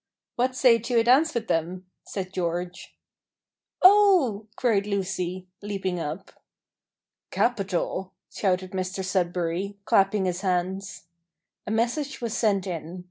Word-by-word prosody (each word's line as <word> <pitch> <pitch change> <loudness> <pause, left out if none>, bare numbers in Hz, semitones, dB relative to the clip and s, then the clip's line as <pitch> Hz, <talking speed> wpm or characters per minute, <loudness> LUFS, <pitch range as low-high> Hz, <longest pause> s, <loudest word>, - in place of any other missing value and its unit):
"What 255 +1 0
say 245 -3 +5
to 240 +2 -1
a 230 - +5
dance 270 +6 +4
with 230 -1 -2
them?" 175 +3 -1 0.2
said 185 -2 -6
George. 175 0 -4 0.9
"Oh!" 370 - +5
cried 215 -5 +1
Lucy, 185 -2 -2 0.2
leaping 195 -3 -3
up. 160 +4 -5 1.0
"Capital!" 190 -4 -1 0.2
shouted 185 -2 0
Mr 185 0 -3
Sudberry, 180 +1 -1
clapping 195 0 +3
his 180 0 -2
hands. 190 0 -2 0.6
A - - -2
message 245 +6 -1
was 235 -3 -3
sent 200 -4 +1
in. 175 -1 -5
195 Hz, 120 wpm, -26 LUFS, 180-230 Hz, 1.0 s, say